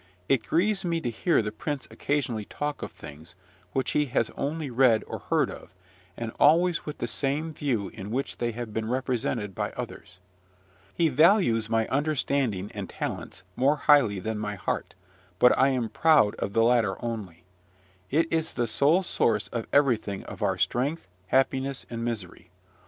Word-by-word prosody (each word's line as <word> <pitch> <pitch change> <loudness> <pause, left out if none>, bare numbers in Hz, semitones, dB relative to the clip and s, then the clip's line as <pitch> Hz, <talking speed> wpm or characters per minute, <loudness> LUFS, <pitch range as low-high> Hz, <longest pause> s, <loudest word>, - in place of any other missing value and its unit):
It 130 -5 +2
grieves 195 +4 +1
me 170 -2 0
to 125 -7 -3
hear 155 +3 +2
the 105 - -3
prince 140 +6 -4
occasionally 125 -7 -2
talk 145 +5 -4
of - - -5
things 75 +4 -11 0.4
which 130 -2 -1
he 150 - +2
has 115 -3 0
only 150 0 -3
read 120 -3 +4
or - - -6
heard - - 0
of, - - -12 0.4
and 115 -1 -4
always 165 +3 +4
with 150 - -5
the - - -2
same 145 +6 -2
view 120 -10 -1
in 100 -3 -8
which 130 +5 -3
they 120 -1 0
have 115 -1 -6
been 110 0 -2
represented 120 -4 -1
by - - -3
others. 90 - -8 0.7
He 165 - +2
values 140 - +4
my 115 -1 +1
understanding 135 -8 0
and - - -6
talents 90 - -5
more 140 +4 +3
highly 140 -9 +4
than 110 +3 -3
my 105 -1 -3
heart, 95 - -3 0.4
but 125 - +6
I 135 - +4
am 130 -4 0
proud 150 -6 +4
of 100 - -3
the 115 - +4
latter 115 -4 +3
only. 100 -8 -5 0.7
It 160 +4 +3
is 160 0 0
the 120 - 0
sole 145 - +3
source 110 - 0
of 115 -2 -4
everything 115 -8 +2
of - - -10
our - - +1
strength, 140 - -1 0.2
happiness, 135 +2 +1
and 115 0 -4
misery. 100 -7 -5
125 Hz, 170 wpm, -27 LUFS, 110-145 Hz, 0.7 s, but